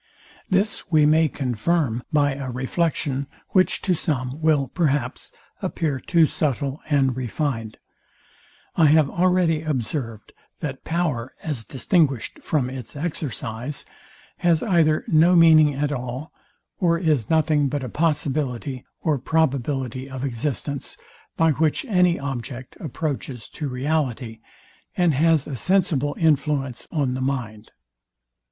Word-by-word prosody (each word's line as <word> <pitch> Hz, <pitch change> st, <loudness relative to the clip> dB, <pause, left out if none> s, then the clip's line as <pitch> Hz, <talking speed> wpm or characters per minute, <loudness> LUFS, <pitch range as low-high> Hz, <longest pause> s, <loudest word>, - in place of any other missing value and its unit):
This 200 Hz, +2 st, +1 dB
we 155 Hz, -2 st, +5 dB
may 160 Hz, +2 st, +4 dB
confirm 130 Hz, -1 st, 0 dB
by 145 Hz, -2 st, +3 dB
a 135 Hz, -1 st, -5 dB
reflection, 135 Hz, +1 st, -1 dB, 0.2 s
which 185 Hz, -3 st, +2 dB
to 185 Hz, -, +2 dB
some 140 Hz, -3 st, -2 dB
will, 155 Hz, -4 st, +3 dB
perhaps, 140 Hz, -3 st, -1 dB, 0.3 s
appear 160 Hz, -7 st, -1 dB
too 165 Hz, +4 st, +3 dB
subtile 140 Hz, -2 st, -2 dB
and 135 Hz, -4 st, +2 dB
refined. 125 Hz, -3 st, -3 dB, 1.0 s
I 160 Hz, -, +5 dB
have 150 Hz, -1 st, +4 dB
already 175 Hz, -3 st, +2 dB
observed, 125 Hz, -6 st, -3 dB, 0.3 s
that 135 Hz, -4 st, -5 dB
power, 155 Hz, -8 st, -2 dB
as 145 Hz, -8 st, -3 dB
distinguished 135 Hz, -, 0 dB
from 145 Hz, -5 st, 0 dB
its 130 Hz, -1 st, -7 dB
exercise, 140 Hz, -4 st, -4 dB, 0.5 s
has 170 Hz, -3 st, +2 dB
either 165 Hz, -6 st, +2 dB
no 165 Hz, +3 st, +5 dB
meaning 155 Hz, -3 st, +6 dB
at 145 Hz, +1 st, -1 dB
all, 125 Hz, +3 st, -5 dB, 0.5 s
or 170 Hz, -3 st, +3 dB
is 155 Hz, -, +1 dB
nothing 155 Hz, -2 st, +3 dB
but 145 Hz, 0 st, -2 dB
a -, -, -3 dB
possibility 140 Hz, -4 st, -1 dB, 0.2 s
or 150 Hz, -4 st, +1 dB
probability 135 Hz, -3 st, -1 dB
of 130 Hz, 0 st, -4 dB
existence; 140 Hz, +2 st, -3 dB, 0.4 s
by 165 Hz, -1 st, +4 dB
which 155 Hz, -, +1 dB
any 180 Hz, -7 st, +3 dB
object 130 Hz, -2 st, -6 dB
approaches 140 Hz, -6 st, -4 dB
to 150 Hz, -3 st, -5 dB
reality, 125 Hz, -4 st, -2 dB, 0.6 s
and 175 Hz, -3 st, +3 dB
has 160 Hz, +1 st, +3 dB
a 140 Hz, -, -5 dB
sensible 150 Hz, -3 st, +1 dB
influence 145 Hz, -5 st, +1 dB
on 140 Hz, -5 st, 0 dB
the 130 Hz, -, -3 dB
mind. 120 Hz, -5 st, -3 dB
145 Hz, 125 wpm, -23 LUFS, 130-160 Hz, 1.0 s, meaning